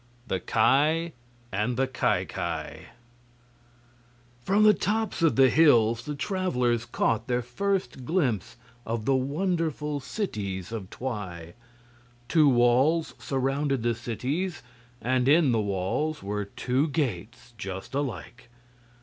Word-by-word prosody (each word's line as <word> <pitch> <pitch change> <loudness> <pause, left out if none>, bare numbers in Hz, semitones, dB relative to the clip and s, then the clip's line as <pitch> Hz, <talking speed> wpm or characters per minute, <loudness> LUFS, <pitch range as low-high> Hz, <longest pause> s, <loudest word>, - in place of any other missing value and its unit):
The 95 - -1
Ki 150 - +2 0.4
and 105 +5 -1
the 135 - +2
Ki 130 -1 0
Ki - - -5 1.6
From 200 - +2
the 215 0 +7
tops 215 +1 -1
of 165 -2 +3
the 135 0 +6
hills 120 -7 +4
the 150 - -4
travelers 125 - 0
caught 115 -1 0
their 125 -1 0
first 155 +1 -2
glimpse 120 - -1 0.3
of 115 -1 -3
the 135 - +3
wonderful 150 +1 -1
cities 105 - -4
of 105 -5 -5
Twi. 95 -9 -6 0.7
Two 155 +1 +5
walls 130 +6 +3
surrounded 135 -1 -1
the 120 0 +2
cities, 135 - -3 0.4
and 125 +1 +1
in 155 -2 +5
the 115 -2 +2
walls 100 +10 -2
were 105 +1 -2
two 130 +8 -1
gates 120 - -3
just 95 +1 -6
alike. 120 - -4
130 Hz, 120 wpm, -27 LUFS, 115-155 Hz, 1.6 s, the